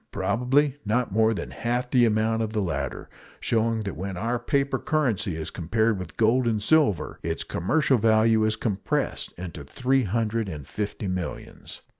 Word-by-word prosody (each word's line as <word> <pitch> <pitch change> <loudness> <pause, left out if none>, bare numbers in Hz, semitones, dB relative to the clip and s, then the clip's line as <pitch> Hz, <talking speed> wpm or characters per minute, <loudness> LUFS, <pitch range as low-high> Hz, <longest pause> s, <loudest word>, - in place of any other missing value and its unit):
Probably 135 +4 +1
not 115 +4 0
more 110 +2 +3
than 110 - -4
half 125 +1 -2
the 125 -2 +5
amount 110 0 +1
of 110 -1 -2
the 110 - 0
latter; 85 -4 -3 0.3
showing 115 0 +1
that 100 -4 -4
when 95 +2 -5
our 115 +5 -1
paper 140 0 0
currency 120 - 0
is 80 0 -5
compared 110 +5 0
with 90 - -8
gold 120 +3 +3
and 110 -2 +1
silver 140 - +2
its - - -2
commercial 135 - +1
value 110 0 +4
is 110 0 +2
compressed 105 -3 -2
into 85 -4 -7
three 130 - +1
hundred 110 +1 -1
and 75 -5 -7
fifty 105 +3 -4
millions. 90 -1 -5
110 Hz, 165 wpm, -25 LUFS, 100-125 Hz, 0.3 s, the